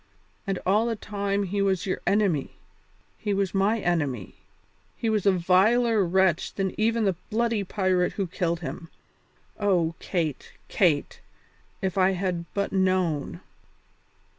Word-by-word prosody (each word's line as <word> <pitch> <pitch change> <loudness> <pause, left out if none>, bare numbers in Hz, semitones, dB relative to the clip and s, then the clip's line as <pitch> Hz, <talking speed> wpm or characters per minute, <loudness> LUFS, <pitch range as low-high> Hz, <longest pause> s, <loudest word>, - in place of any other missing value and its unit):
And 195 -1 0
all 210 +5 +3
the 230 - -1
time 200 -1 -2
he 200 +1 -2
was 190 -2 +1
your 190 - -2
enemy, 195 -9 +1 0.7
he 205 -2 -1
was 195 -2 -1
my 205 +3 +2
enemy, 145 - -1 0.6
he 225 - 0
was 210 -2 +1
a - - +7
viler 200 +5 +3
wretch 185 -1 +1
than 190 -1 -1
even 225 +1 +1
the 195 - +2 0.2
bloody 230 -1 0
pirate 185 -2 0
who 195 - -1
killed 170 -1 -2
him. 165 +1 -6 0.7
Oh, 180 -5 +2
Kate, 160 -7 -3 0.2
Kate! 160 -7 +1 0.6
if 190 0 -1
I 190 +1 +4
had 180 -2 -3
but 200 0 -1
known." 185 -6 0
190 Hz, 140 wpm, -26 LUFS, 175-205 Hz, 0.7 s, a